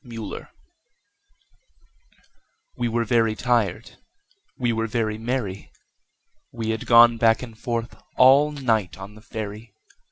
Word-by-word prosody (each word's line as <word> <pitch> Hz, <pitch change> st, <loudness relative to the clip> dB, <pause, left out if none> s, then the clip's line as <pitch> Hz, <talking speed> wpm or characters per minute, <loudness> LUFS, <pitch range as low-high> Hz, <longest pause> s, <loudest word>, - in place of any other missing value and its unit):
Recuerdo 115 Hz, -4 st, -8 dB, 2.3 s
WE 120 Hz, -, -2 dB
WERE 115 Hz, 0 st, 0 dB
very 115 Hz, -1 st, +1 dB
tired, 115 Hz, -6 st, -1 dB, 0.6 s
we 120 Hz, -2 st, 0 dB
were 115 Hz, 0 st, -1 dB
very 110 Hz, -1 st, -2 dB
merry 115 Hz, -5 st, -4 dB, 0.8 s
We 110 Hz, -1 st, -3 dB
had 110 Hz, -, -5 dB
gone 120 Hz, 0 st, +7 dB
back 115 Hz, +1 st, +3 dB
and 115 Hz, -3 st, -10 dB
forth 115 Hz, 0 st, -4 dB, 0.2 s
all 140 Hz, +4 st, +6 dB
night 115 Hz, -11 st, -1 dB
on 95 Hz, +2 st, -10 dB
the 110 Hz, -, -15 dB
ferry. 110 Hz, -1 st, -8 dB
115 Hz, 120 wpm, -23 LUFS, 110-120 Hz, 2.3 s, gone